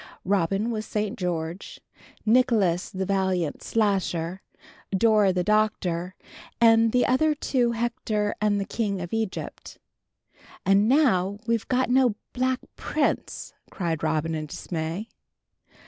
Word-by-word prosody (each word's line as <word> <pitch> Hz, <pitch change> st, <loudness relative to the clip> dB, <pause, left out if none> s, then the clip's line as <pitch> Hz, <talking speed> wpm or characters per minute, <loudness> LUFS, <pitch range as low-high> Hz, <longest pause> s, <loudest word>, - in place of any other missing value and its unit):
Robin 195 Hz, +4 st, +1 dB
was 215 Hz, -1 st, -2 dB
St. 210 Hz, +1 st, -2 dB
George, 175 Hz, -2 st, -4 dB, 0.5 s
Nicholas 215 Hz, -7 st, +3 dB
the 190 Hz, 0 st, -3 dB
valiant 190 Hz, -5 st, 0 dB
Slasher, 190 Hz, -5 st, 0 dB, 0.5 s
Dora 210 Hz, 0 st, +4 dB
the 180 Hz, -1 st, 0 dB
Doctor, 185 Hz, -4 st, 0 dB, 0.4 s
and 225 Hz, -1 st, +5 dB
the 250 Hz, +1 st, +3 dB
other 300 Hz, +4 st, +2 dB
two 245 Hz, -4 st, 0 dB
Hector 225 Hz, -3 st, -1 dB
and 210 Hz, -1 st, +2 dB
the 200 Hz, -, -2 dB
King 200 Hz, -4 st, -2 dB
of 175 Hz, +2 st, -6 dB
Egypt. 220 Hz, -3 st, -4 dB, 0.9 s
"And 200 Hz, +3 st, +4 dB
now 205 Hz, -9 st, +3 dB
we've 230 Hz, -1 st, 0 dB, 0.2 s
no 250 Hz, -3 st, +3 dB, 0.2 s
Black 255 Hz, 0 st, 0 dB
Prince!" -, -, -2 dB, 0.2 s
cried 165 Hz, -5 st, -3 dB
Robin 160 Hz, +1 st, 0 dB
in 155 Hz, -1 st, -3 dB
dismay. 165 Hz, +6 st, -4 dB
205 Hz, 115 wpm, -25 LUFS, 180-230 Hz, 0.9 s, and